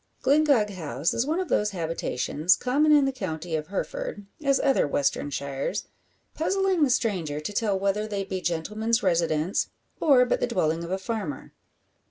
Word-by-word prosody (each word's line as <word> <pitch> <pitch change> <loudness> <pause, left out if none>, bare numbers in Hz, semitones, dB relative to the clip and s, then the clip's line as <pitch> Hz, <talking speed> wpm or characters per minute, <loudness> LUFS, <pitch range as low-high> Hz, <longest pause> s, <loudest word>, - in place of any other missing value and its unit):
Glyngog 280 -7 +3
House 155 -5 -2
is 240 +4 0
one 320 +4 0
of 375 - -2
those 210 -7 +1
habitations, 160 0 +1
common 290 +5 +2
in 290 -2 +6
the 270 - +1
county 175 -9 -4
of 155 -1 -3
Hereford 355 - -4 0.2
as 275 -1 +3
other 270 - +2
western 140 0 0
shires 140 +7 -3 0.5
puzzling 380 +2 +1
the 290 - +4
stranger 185 - 0
to 150 +7 -5
tell 205 -2 +1
whether 200 +2 0
they 200 -2 -2
be 190 -1 -4
gentleman's 215 +8 -1
residence, 170 -1 +1 0.3
or 270 -5 +5
but - - 0
the - - 0
dwelling 165 -1 0
of 170 - -6
a 190 - 0
farmer. 195 - -5
200 Hz, 170 wpm, -26 LUFS, 160-260 Hz, 0.5 s, in